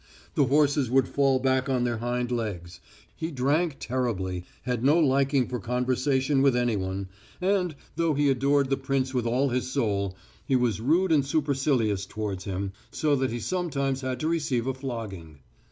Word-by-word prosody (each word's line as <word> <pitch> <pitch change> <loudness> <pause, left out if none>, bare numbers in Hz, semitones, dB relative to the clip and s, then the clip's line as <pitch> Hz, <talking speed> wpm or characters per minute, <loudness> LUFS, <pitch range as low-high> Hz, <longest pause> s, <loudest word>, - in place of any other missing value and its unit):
The 145 - +3
horses 145 -1 +2
would 135 +2 +3
fall 135 -2 +2
back 130 0 +1
on 125 -2 +1
their 120 -2 -1
hind 120 +1 -2
legs. 100 -8 -4 0.4
He 160 - -3
drank 145 +2 0
terribly, 95 -8 -2 0.2
had 125 -1 -2
no 145 +5 +5
liking 135 -4 +3
for 125 - -3
conversation 130 +4 +1
with 135 -2 +4
anyone, 100 -6 -1 0.3
and, 180 -3 +1 0.2
though 165 -2 +1
he 145 +1 +2
adored 140 +1 +2
the 135 - +2
prince 135 -1 -1
with 125 -2 0
all 130 +4 +2
his 125 +1 -1
soul, 100 -7 -1 0.3
he 135 - +1
was 120 -5 +1
rude 165 +8 +2
and 150 -3 +4
supercilious 135 -9 0
towards 100 -3 -4
him, 95 0 -3 0.2
so 150 -2 +1
that 130 0 0
he 120 - -3
sometimes 140 -6 -1
had 130 -1 -3
to 155 - 0
receive 145 -8 0
a 135 - 0
flogging. 110 - -6
130 Hz, 170 wpm, -27 LUFS, 115-140 Hz, 0.4 s, no